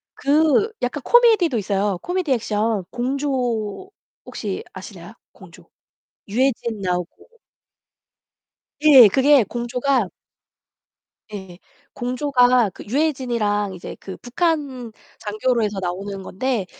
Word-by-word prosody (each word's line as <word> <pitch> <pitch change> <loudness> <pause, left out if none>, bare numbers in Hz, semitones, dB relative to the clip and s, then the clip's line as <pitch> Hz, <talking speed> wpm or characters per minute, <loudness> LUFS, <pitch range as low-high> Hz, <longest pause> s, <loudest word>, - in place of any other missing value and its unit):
그 310 +9 +2
약간 250 +3 -2
코미디도 440 - +4
있어요. 200 -2 -1
코미디 355 -5 -1
액션 215 -3 -1
공조 255 - -2 0.3
혹시 - - -5
아시나요 - - -11 0.2
공조? - - -16 0.6
유해진 235 -1 -1
나오고 180 - -4 1.5
예, 275 -7 +8
그게 270 +4 +4
공조가 240 +1 -1 1.2
예예. 190 -3 -9 0.4
공조가 250 -3 +2
그 - - -12
유해진이랑 235 -7 -1
이제 175 - -9
그 190 - -8
북한 265 -4 -2 0.3
장교로 220 +3 -1
해서 205 -2 -2
나오는 190 +2 -5
건데 220 +1 -2
245 Hz, 225 characters per minute, -21 LUFS, 205-275 Hz, 1.5 s, 예